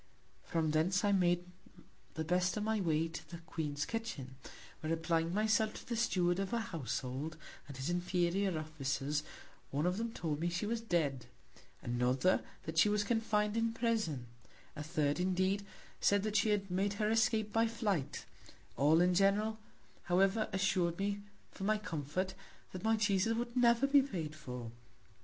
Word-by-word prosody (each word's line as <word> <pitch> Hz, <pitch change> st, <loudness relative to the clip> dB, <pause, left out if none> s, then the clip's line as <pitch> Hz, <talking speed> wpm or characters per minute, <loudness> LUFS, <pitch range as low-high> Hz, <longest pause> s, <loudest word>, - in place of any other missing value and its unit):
From 160 Hz, -2 st, 0 dB
thence 180 Hz, +5 st, +2 dB
I 205 Hz, -, +3 dB
made 175 Hz, -2 st, +2 dB, 0.7 s
the 160 Hz, -, -1 dB
best 180 Hz, +4 st, +1 dB
of 210 Hz, -, -1 dB
my 220 Hz, 0 st, +1 dB
Way 165 Hz, -2 st, +1 dB
to 160 Hz, -, -8 dB
the 170 Hz, -, -7 dB
Queen's 155 Hz, -3 st, -3 dB
Kitchin; 225 Hz, -, -4 dB, 0.5 s
where, 155 Hz, -, -3 dB
applying 165 Hz, 0 st, +1 dB
my 210 Hz, +4 st, +1 dB
self 220 Hz, 0 st, +2 dB
to -, -, -10 dB
the 235 Hz, -, -2 dB
Steward 180 Hz, -6 st, +1 dB
of 195 Hz, -1 st, -1 dB
her 235 Hz, -, 0 dB
Household, 145 Hz, -, -3 dB, 0.3 s
and 140 Hz, -2 st, -8 dB
his 135 Hz, -, -3 dB
inferior 180 Hz, +1 st, +1 dB
Officers; 150 Hz, -1 st, -2 dB, 0.5 s
one 145 Hz, +4 st, -1 dB
of 180 Hz, +1 st, +1 dB
them 230 Hz, 0 st, -2 dB
told 155 Hz, -8 st, -3 dB
me 170 Hz, +2 st, 0 dB
she 170 Hz, +3 st, -2 dB
was 230 Hz, +2 st, -1 dB
dead; 155 Hz, -, 0 dB, 0.6 s
another, 125 Hz, +8 st, +2 dB, 0.2 s
that 160 Hz, 0 st, -1 dB
she 210 Hz, -, +6 dB
was 210 Hz, 0 st, +2 dB
confin'd 210 Hz, -1 st, +1 dB
in 230 Hz, 0 st, +1 dB
Prison; 220 Hz, -, 0 dB, 0.5 s
a -, -, -5 dB
third, 150 Hz, -1 st, 0 dB
indeed, 185 Hz, +2 st, +1 dB, 0.4 s
said 200 Hz, -1 st, +3 dB
that 215 Hz, -1 st, -2 dB
she 205 Hz, +1 st, +3 dB
had 195 Hz, -2 st, 0 dB
made 195 Hz, +2 st, +1 dB
her 210 Hz, +1 st, 0 dB
Escape 220 Hz, -2 st, +2 dB
by 225 Hz, 0 st, +3 dB
Flight; 210 Hz, -, -2 dB, 0.5 s
all 155 Hz, +4 st, +4 dB
in 180 Hz, 0 st, +4 dB
general, 205 Hz, +4 st, +2 dB, 0.5 s
however, 195 Hz, +5 st, +2 dB
assur'd 185 Hz, -3 st, +1 dB
me 200 Hz, +1 st, -1 dB, 0.3 s
for -, -, -8 dB
my 215 Hz, +2 st, +2 dB
Comfort, 185 Hz, 0 st, -3 dB, 0.4 s
that 185 Hz, -, -7 dB
my 225 Hz, 0 st, +3 dB
Cheeses 210 Hz, +1 st, +2 dB
would 240 Hz, +1 st, -3 dB
never 240 Hz, +1 st, +5 dB
be 280 Hz, 0 st, +6 dB
paid 170 Hz, -, -4 dB
for. 125 Hz, -5 st, -7 dB
185 Hz, 170 wpm, -34 LUFS, 160-215 Hz, 0.7 s, she